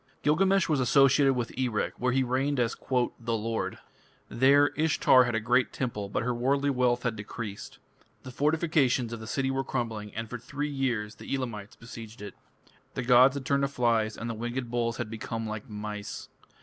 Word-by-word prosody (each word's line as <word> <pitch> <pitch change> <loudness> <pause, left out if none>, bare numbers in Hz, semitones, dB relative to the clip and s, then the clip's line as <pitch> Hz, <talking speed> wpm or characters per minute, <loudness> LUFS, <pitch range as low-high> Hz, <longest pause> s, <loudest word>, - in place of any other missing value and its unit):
Gilgamesh 190 +5 +3
was 150 -4 +1
associated 135 +2 +4
with 120 -2 -3
Erech, 125 -4 -1
where 125 +1 +1
he 130 +1 +2
reigned 130 +2 0
as 120 -1 +1 0.4
"the 115 -1 -2
lord". 115 +1 -3 0.5
There 140 +4 +5
Ishtar 150 -5 +4
had 120 -2 -1
a - - +2
great 120 +3 +2
temple, 105 -6 -3
but 105 - -1
her 125 +1 0
worldly 140 +4 +1
wealth 125 -2 +1
had 120 -3 -1
decreased. 105 0 -7 0.5
The 130 - -8
fortifications 145 -4 +1
of 115 - -5
the 110 - -9
city 135 +2 -1
were 135 0 -1
crumbling, 110 -4 -3
and 115 +1 -4
for 120 +2 -6
three 145 +5 -4
years 120 -6 -1
the - - -9
Elamites 115 -4 -5
besieged 115 -1 -10
it. 100 - -7 0.6
The - - -2
gods 125 +2 +6
had 140 -2 -5
turned 140 +1 +2
to 140 - +2
flies 115 -5 0
and 115 - -5
the 115 - -2
winged 120 +2 -4
bulls 115 -1 -1
had 120 -3 -4
become 115 0 -4
like 110 0 -6
mice. 105 -1 -6
120 Hz, 190 wpm, -28 LUFS, 115-135 Hz, 0.6 s, gods